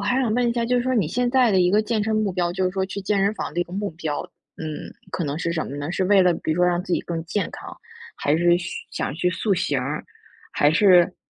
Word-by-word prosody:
还 250 Hz, +6 st, +1 dB
想 240 Hz, -5 st, +1 dB
问 245 Hz, -1 st, +2 dB
一 235 Hz, -, +1 dB
下， 235 Hz, -1 st, -1 dB
就 250 Hz, +1 st, +2 dB
是 245 Hz, -, +2 dB
说 255 Hz, +1 st, 0 dB
你 200 Hz, -10 st, +1 dB
现 245 Hz, +4 st, 0 dB
在 255 Hz, -3 st, +4 dB
的 190 Hz, -2 st, +3 dB
一 180 Hz, 0 st, +3 dB
个 210 Hz, +3 st, +4 dB
健 215 Hz, -1 st, -1 dB
身 220 Hz, 0 st, 0 dB
目 215 Hz, -2 st, +1 dB
标， 175 Hz, -1 st, 0 dB
就 190 Hz, 0 st, -1 dB
是 185 Hz, -, +1 dB
说 190 Hz, 0 st, -1 dB
去 195 Hz, +1 st, -5 dB
健 195 Hz, 0 st, +1 dB
身 200 Hz, -, +2 dB
房 155 Hz, -, -5 dB
的 175 Hz, -, 0 dB
一 175 Hz, -, +1 dB
个 175 Hz, -, -14 dB
目 200 Hz, 0 st, -2 dB
标， 160 Hz, -2 st, -3 dB, 0.4 s
嗯， 155 Hz, -1 st, -6 dB, 0.2 s
可 170 Hz, -, -2 dB
能 145 Hz, +1 st, -3 dB
是 170 Hz, 0 st, -1 dB
什 160 Hz, -, -2 dB
么 140 Hz, -, -6 dB
呢？ 145 Hz, +3 st, -4 dB
是 185 Hz, +1 st, 0 dB
为 200 Hz, +1 st, +5 dB
了 180 Hz, -2 st, +4 dB
比 155 Hz, -, -2 dB
如 -, -, -3 dB
说 180 Hz, -, +3 dB
让 175 Hz, 0 st, +1 dB
自 180 Hz, -, -5 dB
己 -, -, +2 dB
更 165 Hz, -1 st, -5 dB
健 195 Hz, +4 st, -2 dB
康， -, -, -9 dB, 0.4 s
还 145 Hz, +2 st, +1 dB
是 175 Hz, +1 st, +4 dB
嘘 175 Hz, -, -5 dB, 0.2 s
想 -, -, -3 dB
去 180 Hz, +2 st, 0 dB
塑 195 Hz, +3 st, 0 dB
形 145 Hz, -6 st, 0 dB
儿， 145 Hz, +4 st, -4 dB, 0.5 s
还 145 Hz, -, +3 dB
是 180 Hz, 0 st, +5 dB
180 Hz, 315 characters per minute, -23 LUFS, 170-210 Hz, 0.5 s, 为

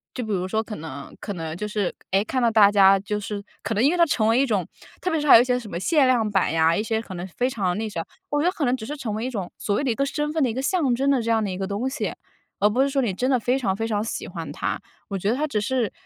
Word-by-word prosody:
就 250 Hz, -, -3 dB
比 220 Hz, -, -4 dB
如 185 Hz, -2 st, -1 dB
说 220 Hz, +3 st, 0 dB
可 215 Hz, -2 st, -7 dB
能 150 Hz, -3 st, -8 dB
可 205 Hz, -, -5 dB
能 160 Hz, -3 st, -5 dB
就 210 Hz, -, -3 dB
是， 205 Hz, -3 st, -1 dB, 0.2 s
诶， 195 Hz, +1 st, +3 dB
看 255 Hz, +4 st, -2 dB
到 235 Hz, -, +4 dB
大 215 Hz, -3 st, +6 dB
家 195 Hz, -1 st, +6 dB
就 210 Hz, +2 st, -3 dB
是 205 Hz, 0 st, -5 dB, 0.2 s
可 -, -, -2 dB
能 215 Hz, -, +2 dB
因 285 Hz, -, +5 dB
为 355 Hz, -, 0 dB
它 340 Hz, -, +6 dB
成 230 Hz, -8 st, +1 dB
为 230 Hz, +2 st, +4 dB
一 275 Hz, -, +4 dB
种 205 Hz, -8 st, 0 dB, 0.4 s
特 365 Hz, -, -1 dB
别 320 Hz, -, +1 dB
是 300 Hz, -, -2 dB
还 -, -, +10 dB
有 230 Hz, -, +9 dB
一 -, -, +3 dB
些 250 Hz, -1 st, +1 dB
什 225 Hz, -4 st, -10 dB
么 170 Hz, -, -4 dB
限 290 Hz, -, +3 dB
量 235 Hz, -4 st, +2 dB
版 190 Hz, -6 st, +2 dB
呀， 165 Hz, 0 st, +4 dB
一 -, -, 0 dB
些 220 Hz, 0 st, -1 dB
可 190 Hz, -4 st, -9 dB
能 175 Hz, +1 st, -5 dB
非 245 Hz, +7 st, -1 dB
常 195 Hz, -7 st, -1 dB
那 220 Hz, +1 st, -2 dB
啥， 170 Hz, -, -3 dB, 0.3 s
我 290 Hz, 0 st, +1 dB
觉 330 Hz, -, +2 dB
得 -, -, +3 dB
可 330 Hz, -, -4 dB
能 250 Hz, 0 st, +2 dB
只 220 Hz, -, -7 dB
是 290 Hz, +6 st, -5 dB
成 245 Hz, -7 st, -4 dB
为 220 Hz, +3 st, -3 dB
一 -, -, -1 dB
种 200 Hz, -8 st, -5 dB
所 200 Hz, -, -1 dB
谓 245 Hz, -, 0 dB
的 265 Hz, -, +1 dB
一 -, -, -1 dB
个 275 Hz, -, +1 dB
身 295 Hz, +1 st, -2 dB
份 320 Hz, -, 0 dB
的 255 Hz, -, +2 dB
一 -, -, -3 dB
个 260 Hz, -, -2 dB
象 275 Hz, -4 st, +1 dB
征 275 Hz, +3 st, +2 dB
的 265 Hz, -3 st, +2 dB
这 230 Hz, -, -3 dB
样 225 Hz, -1 st, +2 dB
的 205 Hz, -, -2 dB
一 180 Hz, -, -4 dB
个 190 Hz, 0 st, -3 dB
东 205 Hz, +6 st, -2 dB
西， 280 Hz, -, -3 dB, 0.5 s
而 205 Hz, -, +5 dB
不 245 Hz, +5 st, +1 dB
是 275 Hz, -, +3 dB
说 275 Hz, 0 st, +1 dB
你 225 Hz, -7 st, 0 dB
真 250 Hz, +8 st, -1 dB
的 260 Hz, -, +4 dB
非 250 Hz, +4 st, +1 dB
常 195 Hz, -7 st, 0 dB
非 225 Hz, +3 st, -2 dB
常 210 Hz, -2 st, 0 dB
喜 225 Hz, -, -4 dB
欢 -, -, -6 dB
它。 -, -, -2 dB, 0.3 s
我 200 Hz, -, -2 dB
觉 195 Hz, +2 st, -1 dB
得 230 Hz, -, +2 dB
它 295 Hz, +3 st, 0 dB
只 250 Hz, -8 st, -1 dB
是 235 Hz, 0 st, 0 dB
225 Hz, 365 characters per minute, -24 LUFS, 200-260 Hz, 0.5 s, 还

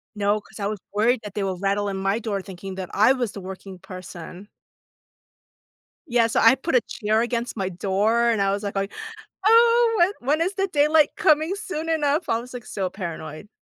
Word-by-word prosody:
No, 205 Hz, +1 st, +1 dB
'cause 220 Hz, -, -15 dB
I 200 Hz, -, -2 dB
was 210 Hz, -1 st, -3 dB
worried 225 Hz, +4 st, +2 dB
that 210 Hz, -2 st, -9 dB
they 205 Hz, -, -2 dB
will 190 Hz, -2 st, -2 dB
rattle 200 Hz, +2 st, 0 dB
in 195 Hz, -, -3 dB
my 195 Hz, +2 st, 0 dB
door 210 Hz, -3 st, -3 dB
thinking 190 Hz, 0 st, -8 dB
that 185 Hz, -2 st, -6 dB
I 215 Hz, +5 st, +5 dB
was 245 Hz, -5 st, -2 dB
the 200 Hz, -, -8 dB
working 190 Hz, 0 st, -9 dB
person. 185 Hz, +1 st, -10 dB, 1.6 s
Yeah, 240 Hz, -4 st, +3 dB
so 225 Hz, -, +1 dB
I 230 Hz, +2 st, +7 dB
put 270 Hz, +3 st, -3 dB
a -, -, +5 dB
chair 215 Hz, +1 st, 0 dB
against 240 Hz, 0 st, -3 dB
my 195 Hz, -3 st, -1 dB
door 205 Hz, +6 st, +1 dB
and 225 Hz, -3 st, 0 dB
I 195 Hz, 0 st, +2 dB
was 200 Hz, +1 st, -2 dB
like 200 Hz, -1 st, -4 dB
going, 195 Hz, 0 st, -1 dB, 0.6 s
"Oh, 465 Hz, +1 st, +5 dB
when 350 Hz, +3 st, +4 dB, 0.3 s
when -, -, -6 dB
is 380 Hz, -, -3 dB
the 390 Hz, 0 st, 0 dB
daylight 300 Hz, -1 st, +4 dB
coming 310 Hz, +4 st, +3 dB
soon 365 Hz, -6 st, -5 dB
enough?" 305 Hz, 0 st, +1 dB
I 225 Hz, -, +2 dB
was, 250 Hz, +2 st, -11 dB
like, 245 Hz, -2 st, -7 dB
so 190 Hz, -2 st, -2 dB
paranoid. 170 Hz, -2 st, -7 dB
215 Hz, 205 wpm, -23 LUFS, 195-270 Hz, 1.6 s, I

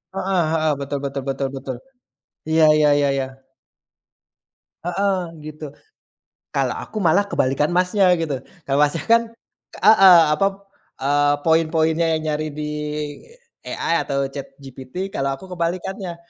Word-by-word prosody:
Heeh 190 Hz, -2 st, 0 dB
heeh, 155 Hz, -1 st, +1 dB
betul 140 Hz, 0 st, -3 dB
betul 140 Hz, -1 st, -4 dB
betul 135 Hz, 0 st, -1 dB
betul. 135 Hz, -1 st, -5 dB, 0.8 s
Iya 160 Hz, 0 st, +5 dB
iya 150 Hz, -1 st, +4 dB
iya 140 Hz, -1 st, +2 dB
iya. 135 Hz, -1 st, -1 dB, 1.6 s
Heeh 195 Hz, +2 st, 0 dB, 0.2 s
gitu. 155 Hz, 0 st, -8 dB, 0.9 s
Kalau -, -, 0 dB
aku -, -, -11 dB
malah 195 Hz, +6 st, +4 dB
kebalikan 135 Hz, -2 st, +1 dB
Masnya 185 Hz, +1 st, +3 dB
gitu. 155 Hz, -6 st, -3 dB, 0.3 s
Kalau 140 Hz, 0 st, +1 dB
Masnya 150 Hz, +1 st, 0 dB
kan 230 Hz, 0 st, +5 dB, 0.6 s
heeh 195 Hz, -5 st, +8 dB
apa, 195 Hz, +5 st, +2 dB, 0.5 s
eee, 145 Hz, +1 st, +2 dB
poin-poinnya 160 Hz, 0 st, +2 dB
yang 155 Hz, -, -4 dB
nyari 155 Hz, +1 st, -2 dB
di 150 Hz, +1 st, -5 dB, 1.0 s
AI 165 Hz, -, -1 dB
atau 140 Hz, 0 st, -1 dB
ChatGPT, 135 Hz, +6 st, -8 dB
kalau 135 Hz, 0 st, -1 dB
aku 190 Hz, -, -14 dB
kebalikannya. 180 Hz, +1 st, -3 dB
155 Hz, 125 wpm, -21 LUFS, 140-180 Hz, 1.6 s, heeh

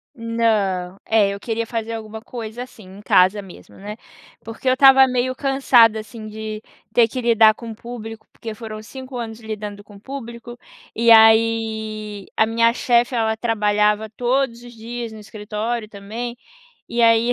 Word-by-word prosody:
Não, 215 Hz, -6 st, -1 dB
é, 215 Hz, -3 st, +3 dB
eu 200 Hz, 0 st, -5 dB
queria 230 Hz, +1 st, -3 dB
fazer 230 Hz, 0 st, -4 dB
alguma 220 Hz, 0 st, -7 dB
coisa, 235 Hz, 0 st, -7 dB
assim, 230 Hz, -4 st, -14 dB
em 205 Hz, -, -12 dB
casa 190 Hz, +1 st, +3 dB
mesmo, 190 Hz, -2 st, -14 dB
né? 210 Hz, +2 st, -7 dB, 0.5 s
Porque 225 Hz, +3 st, -8 dB
eu 255 Hz, -, +5 dB
estava 270 Hz, 0 st, +7 dB
meio 255 Hz, 0 st, 0 dB
cansada, 255 Hz, -5 st, +4 dB
assim, 215 Hz, 0 st, -10 dB
de 215 Hz, 0 st, -6 dB, 0.3 s
ter 235 Hz, -2 st, +5 dB
que 255 Hz, +2 st, -5 dB
lidar 225 Hz, -2 st, +5 dB
com 230 Hz, -2 st, -8 dB
público, 225 Hz, -1 st, -9 dB
porque 225 Hz, -1 st, -7 dB
foram 215 Hz, -1 st, -8 dB
5 260 Hz, +3 st, -10 dB
anos 225 Hz, -1 st, -6 dB
lidando 210 Hz, -2 st, -6 dB
com 205 Hz, -1 st, -15 dB
público. 240 Hz, 0 st, -9 dB, 0.3 s
E 230 Hz, +1 st, +2 dB
aí, 220 Hz, -2 st, +3 dB
a 220 Hz, -, +4 dB
minha 230 Hz, +1 st, +2 dB
chefe 245 Hz, 0 st, +1 dB
ela 220 Hz, -1 st, 0 dB
trabalhava 210 Hz, -1 st, +1 dB
todos 245 Hz, +1 st, -1 dB
os 240 Hz, 0 st, -12 dB
dias 230 Hz, 0 st, -7 dB
no 215 Hz, -, -10 dB
escritório 215 Hz, +2 st, -4 dB
também. 220 Hz, +4 st, -6 dB, 0.5 s
E 235 Hz, 0 st, 0 dB
aí 230 Hz, +1 st, +4 dB
era -, -, +4 dB
225 Hz, 165 wpm, -21 LUFS, 215-240 Hz, 0.5 s, estava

